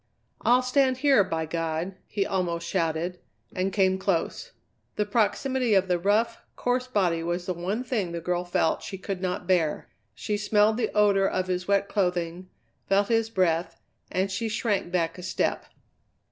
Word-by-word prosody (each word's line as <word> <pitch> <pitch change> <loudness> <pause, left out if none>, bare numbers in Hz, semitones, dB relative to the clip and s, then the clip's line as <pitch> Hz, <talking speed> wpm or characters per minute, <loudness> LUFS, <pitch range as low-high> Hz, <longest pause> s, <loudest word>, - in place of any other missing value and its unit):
"I'll 250 +1 +4
stand 260 0 +2
here, 270 -5 +5
by 165 -3 -2
God!" 165 +3 -2
he 200 -2 -1
almost 170 -3 -2
shouted, 170 0 -1 0.4
and 185 +1 0
came 190 -2 +2
close. 195 - -1 0.4
The 210 - 0
proximity 235 +2 +1
of 190 -1 +3
the 180 -1 +1
rough, 220 +5 +1 0.2
coarse 250 +1 0
body 185 -9 +1
was 175 +1 -2
the 185 - -1
one 190 +8 -3
thing 215 -9 -2
the 170 - -3
girl 175 +1 -1
felt 175 -2 0
she 195 - -6
could 190 -1 -5
not 180 -1 -2
bear. 170 -4 +1 0.3
She 210 - -2
smelled 210 +1 +3
the 245 - 0
odour 200 -2 +4
of 185 -1 -1
his 180 -1 -2
wet 200 0 +2
clothing, 180 -2 -1 0.4
felt 200 +1 +3
his 225 -1 +2
breath, 175 -5 0 0.3
and 190 +1 0
she 225 +4 -2
shrank 210 -5 -1
back 170 -1 -1
a - - -6
step. 185 - -1
190 Hz, 170 wpm, -26 LUFS, 175-210 Hz, 0.4 s, here